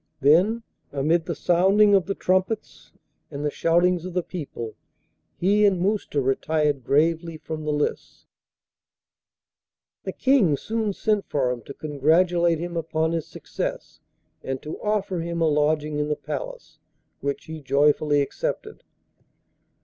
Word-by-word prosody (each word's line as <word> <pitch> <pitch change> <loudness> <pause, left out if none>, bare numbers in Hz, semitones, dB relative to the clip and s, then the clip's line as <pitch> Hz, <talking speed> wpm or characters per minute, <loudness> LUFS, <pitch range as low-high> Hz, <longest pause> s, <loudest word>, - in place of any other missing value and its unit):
Then, 185 - +4 0.3
amid 160 +4 +1
the 170 - -2
sounding 195 +6 +4
of 190 -3 +3
the 195 - -1
trumpets 185 +4 -1 0.4
and 145 0 -5
the 150 - 0
shoutings 175 +2 +2
of 185 -1 -7
the 180 - +1
people, 140 -11 -6 0.6
he 205 +4 +3
and 195 -3 +4
Mousta 195 -5 0
retired 145 +1 0
gravely 165 +4 +1
from 155 0 -6
the 150 - 0
lists. 150 0 -3 1.8
The - - -3
King 235 - +3
soon 220 +1 -2
sent 210 0 0
for 130 -3 +1
him 125 -1 -4
to 140 - -9
congratulate 165 +4 +2
him 170 +2 -5
upon 160 0 -1
his 165 -2 -2
success, - - -5 0.4
and 130 0 -3
to 155 - -7
offer 205 -4 -1
him 170 0 -3
a 165 - +3
lodging 150 0 +1
in 150 - 0
the 150 - 0
Palace, - - -7 0.4
which 140 0 -3
he 160 -1 -8
joyfully 145 +1 +3
accepted. 440 - -4
165 Hz, 140 wpm, -24 LUFS, 150-185 Hz, 1.8 s, Then